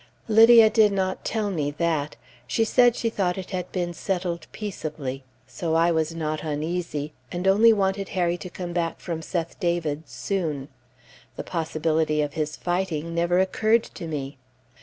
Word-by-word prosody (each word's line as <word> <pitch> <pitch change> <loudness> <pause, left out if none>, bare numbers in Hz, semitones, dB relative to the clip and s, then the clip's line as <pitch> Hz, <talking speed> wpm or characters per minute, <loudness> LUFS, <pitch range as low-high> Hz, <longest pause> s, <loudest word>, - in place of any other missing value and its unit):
Lydia 225 +1 +8
did 215 -2 +5
not 190 -1 -1
tell 215 -3 -1
me 150 -6 -1
that; 150 -1 -1 0.3
she 225 - +1
said 240 +1 +4
she 230 - -1
thought 185 -4 0
it 190 0 -7
had 180 -1 -4
been 175 -2 -2
settled 175 -2 -3
peaceably, 150 -10 -5 0.2
so 160 +5 -3
I 165 +1 +4
was 160 0 0
not 155 -1 -2
uneasy, 155 -1 -3 0.2
and 180 +2 -2
only 215 +4 +6
wanted 195 -2 0
Harry 175 -1 +2
to 180 - -8
come 175 -1 -6
back 170 -1 -1
from 165 -3 -4
Seth 170 0 -4
David's 160 - -1
soon. 150 0 -3 0.7
The - - -5
possibility 160 -2 0
of 145 -1 -4
his 155 -1 -2
fighting 175 -3 -2
never 170 +1 +1
occurred 215 +4 +3
to 170 - -8
me. 140 -3 -5
170 Hz, 160 wpm, -25 LUFS, 155-190 Hz, 0.7 s, Lydia